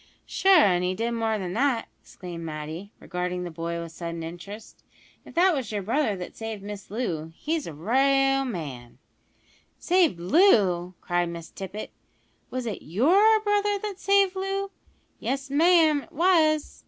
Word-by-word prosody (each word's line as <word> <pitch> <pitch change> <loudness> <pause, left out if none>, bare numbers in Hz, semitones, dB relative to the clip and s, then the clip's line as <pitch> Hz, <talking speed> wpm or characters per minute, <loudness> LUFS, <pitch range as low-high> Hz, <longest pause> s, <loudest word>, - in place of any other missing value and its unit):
"Sure, 385 0 +4
an' 185 - +4
he 180 +1 -1
did 230 +4 -1
more 225 -2 0
than 180 -3 -4
that," 245 0 +1
exclaimed 175 -2 -9
Matty, 160 +5 -6
regarding 180 0 -3
the 175 - -5
boy 170 +1 -4
with 170 -1 -7
sudden 170 0 -6
interest. 195 +6 -9 0.4
"If - - -14
that 360 +2 +5
was 260 -8 -3
yer 205 -2 -3
brother 225 +1 0
that 180 -1 -8
saved 225 -3 -6
Miss 205 -1 -8
Loo 175 -8 -3
he's 320 0 -2
a - - -5
ra'al 270 - +2
man 140 - -6 0.4
" - - -35
"Saved 350 - +3
Loo!" 185 - +3
cried 175 -1 0
Miss 170 -1 -8
Tippet; 195 +2 -7 0.6
"was 255 -1 -4
it 220 -4 -4
your 370 - +4
brother 415 -1 +1
that 400 -1 -6
saved 395 -1 +3
Loo?" 390 +1 -2 0.5
"Yes, 275 +1 -3
ma'am, 315 -1 +4
it - - -17
was." 315 -3 +2
225 Hz, 160 wpm, -26 LUFS, -, 0.6 s, that